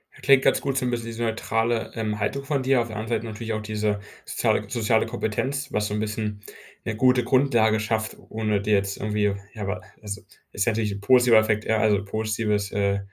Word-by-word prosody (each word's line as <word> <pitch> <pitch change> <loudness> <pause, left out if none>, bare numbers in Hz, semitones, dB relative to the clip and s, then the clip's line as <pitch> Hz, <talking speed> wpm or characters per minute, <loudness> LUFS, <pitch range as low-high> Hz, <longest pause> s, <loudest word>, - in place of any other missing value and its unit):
Das - - -17
klingt 135 -1 +6
ganz - - +4
gut 135 -1 -1
so 130 - +1
'n - - +1
bisschen 120 -1 -2
diese 115 0 -4
neutrale, 115 0 0
ähm, 105 -2 -2
Haltung 120 +7 -1
von 140 -2 -1
dir. 130 -1 +3
Auf 115 - -3
der 110 - -8
anderen 110 +1 -1
Seite - - -8
natürlich 110 +1 -4
auch 110 - -2
diese 105 -1 -1 0.3
soziale - - 0
soziale 115 -2 +2
Kompetenz, 125 +5 -2
was 105 0 0
so 105 - -4
'n 105 - -1
bisschen 105 -1 -3 0.4
'ne 115 - -2
gute 125 +2 +4
Grundlage 120 -4 +3
schafft, 110 0 -1
ohne 110 -2 0
dir 105 +1 +1
jetzt 100 0 +1
irgendwie 105 -1 0 0.2
ja, 110 - -8
aber 95 -2 -3 0.2
also, 100 -1 -6 0.3
ist 100 - 0
natürlich 110 -2 +1
'n 100 - -7
positiver 125 +1 +6
Effekt, 110 0 +1
ja, 110 - +2
also 105 -2 +2
positives 105 -1 -1
äh, 100 -1 +1
110 Hz, 215 wpm, -25 LUFS, 105-120 Hz, 0.4 s, klingt